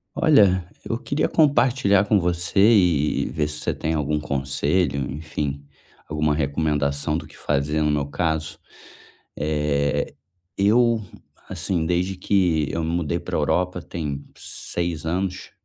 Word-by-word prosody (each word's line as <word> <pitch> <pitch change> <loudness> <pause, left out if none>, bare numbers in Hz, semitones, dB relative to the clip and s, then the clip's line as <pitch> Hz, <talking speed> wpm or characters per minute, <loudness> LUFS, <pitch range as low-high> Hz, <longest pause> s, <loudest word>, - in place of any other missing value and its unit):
Olha 100 - +4 0.2
eu - - -1
queria 140 - 0
compartilhar 120 - +3
com 105 -1 +3
você 85 +2 -1
e 90 -9 +4
e - - -3
ver 75 -1 0
se 75 0 -6
você - - -1
tem 80 - -2
algum 75 -1 0
conselho, 70 +2 -1
enfim. 75 -1 -4 0.4
Alguma 75 -1 0
recomendação 75 0 0
do - - -6
que - - -16
fazer 75 +2 0
no 75 - +2
meu 75 -1 +1
caso, 80 +1 -2 0.8
eh, 75 -1 0 0.4
eu 115 +3 +3 0.5
assim 85 -4 -1
desde 90 +2 0
que 90 -6 +2
eu 85 - -2
me 80 - -1
mudei 85 0 -1
para - - -5
a - - +1
Europa 90 0 0
tem 75 -5 -5
seis 85 -3 -4
anos, 95 +3 -2
80 Hz, 140 wpm, -23 LUFS, 75-95 Hz, 0.8 s, Olha